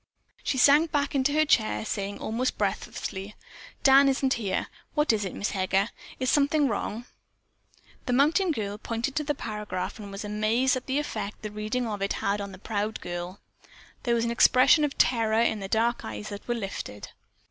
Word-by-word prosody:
She 265 - -1
sank 290 +5 +5
back 285 -1 0
into 275 0 +2
her 310 +1 +3
chair, 220 -6 +2
saying, 200 -1 -3
almost 240 +4 -2
breathlessly, 195 +2 -3 0.5
"Dan 275 0 +7
isn't 270 0 +1
here. 200 -5 -1 0.3
What 300 -5 +3
is 210 -2 0
it, 190 - -5
Miss 205 - -2
Heger? 195 +2 +1 0.3
Is 255 -1 +1
something 290 0 +3
wrong?" 225 +1 -3 1.0
The 250 - +1
mountain 310 +9 +3
girl 210 -6 -3
pointed 230 +5 -3
to 305 - +1
the 295 0 -1
paragraph 210 -4 -5
and 200 -2 -8
was 195 +2 -6
amazed 215 +5 +1
at 255 - -5
the 265 +1 0
effect 215 -9 -4
the 215 - -4
reading 215 +4 -2
of 210 -3 -4
it 195 - 0
had 200 +1 -1
upon 200 -1 -6
the 185 - -10
proud 210 +2 -3
girl. 175 +2 -6 0.6
There 240 -2 +1
was 230 0 +1
an 235 - -1
expression 255 +6 +5
of 290 -2 -1
terror 225 -2 +3
in 225 -2 +2
the 195 - -5
dark 230 +4 +1
eyes 105 -1 -6
that 205 0 -8
were 240 - 0
lifted. 195 - -6
225 Hz, 190 wpm, -27 LUFS, 205-265 Hz, 1.0 s, Dan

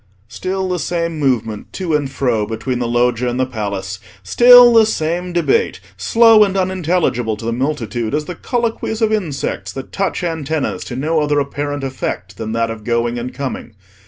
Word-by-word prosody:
Still 190 +9 -3
the 180 -1 -1
same 170 -1 -2
movement 115 -6 -1
to 180 -4 -3
and 145 -3 0
fro 120 -6 0
between 115 +3 -3
the 120 - -1
Loggia 120 +1 +1
and 120 +1 -3
the 130 - +2
Palace; 100 -6 -4 0.2
still 245 - +8
the 225 -1 +6
same 175 -1 -2
debate, 170 -5 +1 0.2
slow 225 - +5
and 195 -1 0
unintelligible 175 - 0
to 115 - -8
the 115 - -1
multitude 120 -3 -2
as 150 0 -2
the 180 - -5
colloquies 225 +2 -2
of 220 0 +2
insects 165 -10 -3
that 135 - -8
touch 195 -2 -2
antennas 160 -3 -2
to 120 - -6
no 155 +5 0
other 145 0 +1
apparent 145 0 -3
effect 130 -1 -4
than 110 -1 -4
that 115 0 0
of 110 -1 -8
going 120 +1 0
and 125 +2 -5
coming. 130 -4 -5
140 Hz, 180 wpm, -18 LUFS, 120-180 Hz, 0.2 s, still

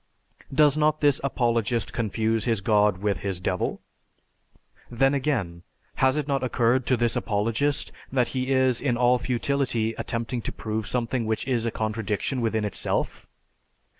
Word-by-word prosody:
Does 145 0 +4
not 155 0 +2
this 145 -2 +3
apologist 120 -4 0
confuse 110 0 0
his 115 -4 +1
god 105 -1 +3
with 100 -4 0
his 95 -1 -3
devil? 90 0 -2 1.1
Then 135 +3 +2
again, 115 - -1 0.4
has 130 +2 +3
it 150 -2 -2
not 135 -2 0
occurred 125 0 +1
to 130 - +3
this 120 0 +1
apologist 115 +7 0 0.2
that 125 -2 +1
he 130 0 -2
is 130 -2 +3
in 125 -4 0
all 125 +1 +3
futility 125 -3 0
attempting 115 +1 -3
to - - -4
prove 110 -1 -4
something 120 -1 -1
which 110 +3 -2
is 120 -3 0
a - - +2
contradiction 110 +3 -2
within 110 -2 0
itself? 100 - -2
120 Hz, 150 wpm, -25 LUFS, 110-130 Hz, 1.1 s, Does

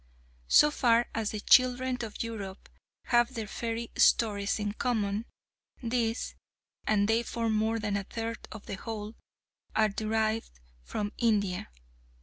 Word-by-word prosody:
So 300 - +6
far 240 -4 +3
as 220 -2 -1
the 215 - -4
children 255 +2 +4
of 225 -1 -4
Europe 205 -4 -7 0.3
have 240 -1 +2
their 225 -2 -3
fairy 230 +2 -4
stories 200 -3 +3
in 210 -1 -2
common, 215 -2 -1 0.6
these 230 -1 -1 0.5
and 205 -2 +3
they 225 +1 +3
form 230 -1 -1
more 220 +1 +1
than 210 -2 -1
a 200 - -1
third 225 +3 -5
of 215 - -9
the 195 - -5
whole 215 0 -6 0.6
are 215 -1 +4
derived 220 - -1 0.2
from 205 - -3
India. 200 - +1
220 Hz, 135 wpm, -30 LUFS, 210-230 Hz, 0.6 s, So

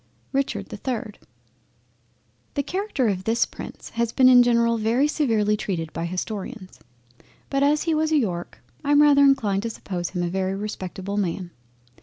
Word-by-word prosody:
RICHARD 275 0 -1
the - - -8
3rd 230 -5 -4 1.4
The 285 - 0
Character 370 - -1
of 190 -3 -1
this 230 +2 +2
Prince - - -9
has 235 0 -1
been 260 +1 +5
in 250 -1 +8
general 235 -1 +3
very 235 +6 +2
severely 225 -9 +1
treated 175 -6 -4
by 165 - -3
Historians, 185 +1 -5 0.7
but 275 0 +1
as 295 +2 +3
he 330 - +1
was 315 0 +1
a 310 - +4
York, 180 -10 -3 0.2
I 290 - +2
am 290 +1 +6
rather 285 -1 +6
inclined 220 -8 +3
to 230 - -3
suppose 180 -5 -5
him 180 -2 -3
a - - 0
very 190 +2 -1
respectable 200 -1 -5
Man. 180 -2 -2
225 Hz, 170 wpm, -24 LUFS, 190-275 Hz, 1.4 s, in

